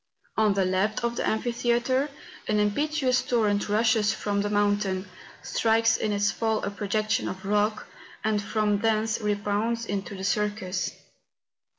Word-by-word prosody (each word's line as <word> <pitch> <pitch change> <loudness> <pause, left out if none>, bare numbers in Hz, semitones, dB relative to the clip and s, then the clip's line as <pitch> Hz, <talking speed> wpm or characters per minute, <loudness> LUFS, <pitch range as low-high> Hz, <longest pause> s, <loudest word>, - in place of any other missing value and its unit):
On 215 -2 +3
the 195 -1 +2
left 190 +5 0
of 235 0 0
the - - -2
amphi¬ 235 +2 0
theatre, 240 +4 +1 0.4
an 210 - +1
impetuous 255 +5 +1
torrent 210 -4 +1
rushes 220 0 +3
from 205 -2 -1
the 205 - -1
mountain, 205 -2 +1 0.4
strikes 225 0 +2
in 215 - -1
its 205 +1 +2
fall 220 -1 -1
a 200 - -2
projection 215 +2 -1
of 190 +1 -7
rock, 210 +1 +1 0.4
and 215 -1 +1
from 210 0 0
thence 220 0 +1
rebounds 210 +3 -1
into 200 0 -4
the 190 - -7
circus. 205 -1 -1
210 Hz, 150 wpm, -26 LUFS, 205-225 Hz, 0.4 s, On